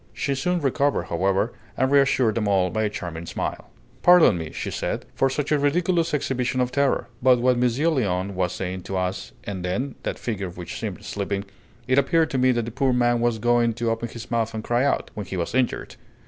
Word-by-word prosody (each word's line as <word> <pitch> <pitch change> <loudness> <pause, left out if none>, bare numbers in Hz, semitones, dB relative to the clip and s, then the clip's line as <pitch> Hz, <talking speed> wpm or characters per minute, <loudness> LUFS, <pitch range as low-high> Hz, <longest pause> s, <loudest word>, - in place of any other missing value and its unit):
She 140 +5 -1
soon 175 +6 0
recovered, 140 -5 +1
however, 95 +6 +1 0.2
and 130 +1 +1
reassured 135 -5 +4
them 105 -1 -1
all 95 -3 +2
by 110 0 0
a - - +1
charming 85 -4 -6
smile. - - -4 0.3
"Pardon 175 - +7
me," 80 -2 -5
she - - -4
said, - - -3
"for 135 - +2
such 145 +2 -2
a 150 - +3
ridiculous 165 +3 +1
exhibition 130 -3 -1
of 125 0 +1
terror; 140 -3 +1
but 125 0 +5
what 125 0 +3
Monsieur 125 +4 +1
Léon 100 - 0
was 90 -1 0
saying 95 0 -4
to 95 - -1
us 95 +1 -3
and 95 -3 -5
then 120 +10 -2
that - - -3
figure 100 -6 -3
which 90 -1 -7
seemed - - -5
sleeping 100 0 -3 0.4
it 130 +2 +4
appeared 160 +3 +2
to 130 - 0
me 130 0 +4
that 120 -2 0
the 115 - -5
poor 130 +2 +1
man 120 -1 +2
was 120 -1 +1
going 120 +1 +2
to 115 0 0
open 115 +1 -3
his 115 +1 -9
mouth 115 -1 0
and 110 - -4
cry 120 +2 +1
out, 140 - 0
when 105 -3 -6
he 95 - -4
was 85 +3 -2
injured." 130 -1 -1
120 Hz, 220 wpm, -24 LUFS, 100-135 Hz, 0.4 s, Pardon